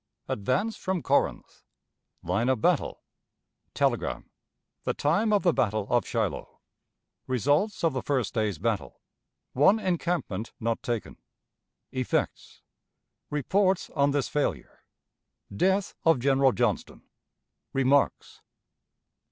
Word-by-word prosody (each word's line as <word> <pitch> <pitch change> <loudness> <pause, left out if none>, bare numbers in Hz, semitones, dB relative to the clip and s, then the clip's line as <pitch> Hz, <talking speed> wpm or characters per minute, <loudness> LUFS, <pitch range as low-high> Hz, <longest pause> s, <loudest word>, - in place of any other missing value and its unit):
Advance 190 - -1
from 185 -3 -2
Corinth. - - 0 0.6
Line 95 +9 0
of 130 - +2
Battle. - - +1 0.7
Telegram. - - -1 0.5
The - - -1
Time 200 +10 +1
of 205 -2 +3
the 175 -3 +4
Battle 110 -4 0
of 120 -1 +2
Shiloh. - - -3 0.7
Results 145 - +1
of 165 -3 +3
the 130 - -2
First 130 -7 -1
Day's 110 -6 0
Battle. - - -2 0.5
One 150 - +5
Encampment 170 - -2
not 115 0 -1
taken. 120 -3 -4 0.7
Effects. 130 -1 -2 0.7
Reports 185 +6 +1
on 140 -1 +2
this 140 -1 0
Failure. 150 - -3 0.7
Death 190 - +1
of 165 -3 +5
General 135 +1 +4
Johnston. 120 -5 -1 0.7
Remarks. 135 +1 +1
140 Hz, 105 wpm, -27 LUFS, 120-175 Hz, 0.7 s, One